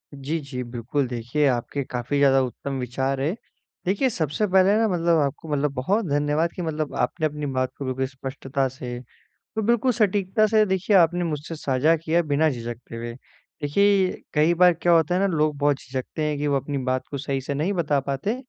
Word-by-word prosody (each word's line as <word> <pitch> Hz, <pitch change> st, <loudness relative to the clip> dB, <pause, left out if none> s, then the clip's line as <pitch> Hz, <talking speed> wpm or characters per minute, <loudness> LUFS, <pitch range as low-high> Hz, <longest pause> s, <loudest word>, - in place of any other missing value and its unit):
जी, 140 Hz, +4 st, -3 dB
जी। 135 Hz, -3 st, -6 dB
बिल्कुल 125 Hz, +3 st, -2 dB
देखिए 120 Hz, +5 st, -1 dB
आपके 130 Hz, +2 st, -1 dB
काफ़ी 125 Hz, +2 st, -3 dB
ज़्यादा 135 Hz, -1 st, +5 dB
उत्तम 135 Hz, +2 st, -4 dB
विचार 130 Hz, +2 st, -2 dB
हैं, 150 Hz, +6 st, 0 dB, 0.5 s
देखिए 200 Hz, +8 st, +2 dB
सबसे 160 Hz, -, -1 dB
पहले 190 Hz, +1 st, +4 dB
ना 225 Hz, 0 st, +3 dB
मतलब 170 Hz, -3 st, +2 dB
आपको 145 Hz, +3 st, -3 dB
मतलब 145 Hz, -1 st, 0 dB
बहुत 195 Hz, -, 0 dB
धन्यवाद 145 Hz, +3 st, +1 dB
कि -, -, -4 dB
मतलब 155 Hz, -3 st, -3 dB
आपने 160 Hz, -, 0 dB
अपनी 150 Hz, -1 st, -3 dB
बात 130 Hz, -2 st, -1 dB
को 140 Hz, -, -5 dB
बिल्कुल 130 Hz, 0 st, -1 dB
स्पष्टता 135 Hz, 0 st, -3 dB
से 125 Hz, -2 st, -7 dB, 0.4 s
और 220 Hz, -, -6 dB
बिल्कुल 235 Hz, +3 st, +3 dB
सटीकता 210 Hz, -1 st, +2 dB
से 215 Hz, 0 st, +4 dB
देखिए 190 Hz, +1 st, +2 dB
आपने 175 Hz, 0 st, +4 dB
मुझसे 155 Hz, 0 st, -4 dB
साझा 145 Hz, +2 st, +2 dB
किया 165 Hz, +2 st, +1 dB
बिना 155 Hz, 0 st, +2 dB
झिझकते 120 Hz, -2 st, -7 dB
हुए। 115 Hz, 0 st, -5 dB, 0.5 s
देखिए 195 Hz, +5 st, +3 dB, 0.2 s
कई 155 Hz, +3 st, +4 dB
बार 180 Hz, +1 st, +6 dB
क्या 175 Hz, -, +4 dB
होता 165 Hz, +1 st, +3 dB
है 185 Hz, -, +2 dB
ना 200 Hz, -, +3 dB
लोग 150 Hz, -1 st, +1 dB
बहुत 145 Hz, 0 st, +2 dB
झिझकते 130 Hz, +4 st, -5 dB
हैं 150 Hz, -1 st, 0 dB
कि 145 Hz, -, -1 dB
वो 140 Hz, -1 st, +2 dB
अपनी 140 Hz, +1 st, -2 dB
बात 130 Hz, 0 st, 0 dB
को 140 Hz, -, -4 dB
सही 135 Hz, 0 st, -2 dB
से 140 Hz, +2 st, -4 dB
नहीं 155 Hz, +8 st, 0 dB
बता 155 Hz, -6 st, +1 dB
पाते, 140 Hz, -, -2 dB
150 Hz, 200 wpm, -24 LUFS, 135-175 Hz, 0.5 s, बार